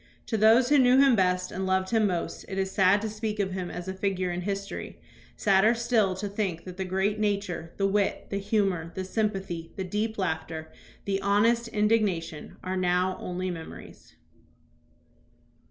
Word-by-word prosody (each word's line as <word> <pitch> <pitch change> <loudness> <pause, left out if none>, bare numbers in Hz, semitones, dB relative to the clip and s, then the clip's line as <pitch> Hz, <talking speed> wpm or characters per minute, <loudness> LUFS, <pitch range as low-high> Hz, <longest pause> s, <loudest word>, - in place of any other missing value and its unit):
To 225 - -2
those 225 +4 +5
who 290 -1 +5
knew 255 0 +5
him 275 -3 +6
best 185 -2 +1
and 190 +1 -3
loved 190 0 +1
him 220 -2 +3
most 175 -3 -3
it 195 - -5
is 190 0 -1
sad 200 +3 +4
to - - -1
speak 215 0 -4
of 195 -2 0
him 185 -1 -4
as 175 +1 -6
a 190 - -3
figure 190 -2 -1
in 175 +1 -3
history, 200 +1 -5 0.4
sadder 205 +3 +4
still 230 -5 +1
to 200 +2 -4
think 195 -5 -3
that 180 -1 -9
the 190 - -2
great 190 +3 0
nature, 200 -6 -2
the 195 - +1
wit, 200 0 0
the 200 - -1
humor, 195 -5 0
the 190 - -3
sympathy, 190 -5 -2
the 190 - -3
deep 215 +4 -2
laughter, 160 -3 -3 0.3
the 195 -1 -1
honest 230 +4 +2
indigna 210 -5 +2
tion, 155 -2 -10
are 185 +1 -2
now 185 0 +1
only 180 +1 -3
memories. 165 -2 -10
195 Hz, 180 wpm, -27 LUFS, 185-210 Hz, 0.4 s, him